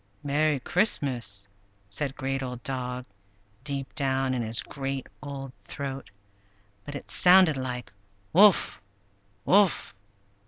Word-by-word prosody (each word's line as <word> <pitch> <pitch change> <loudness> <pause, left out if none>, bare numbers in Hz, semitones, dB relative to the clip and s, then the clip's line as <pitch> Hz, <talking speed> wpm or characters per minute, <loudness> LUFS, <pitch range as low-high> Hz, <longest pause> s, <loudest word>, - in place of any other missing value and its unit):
"Merry 145 0 +1
Christmas!" 125 - +1 0.4
said 135 +6 -1
Great 135 0 -2
Old 125 -2 -6
Dog, 125 -1 -3 0.6
deep 140 -1 -3
down 135 -2 0
in 125 - -1
his 115 0 0
great 135 -1 -4 0.2
old 140 -2 -6 0.2
throat 135 -6 -6 0.8
(but 145 - -7
it - - -7
sounded 180 -3 +6
like 125 -4 -5 0.4
"Wuff! 200 +2 +6
135 Hz, 105 wpm, -27 LUFS, 125-145 Hz, 0.8 s, sounded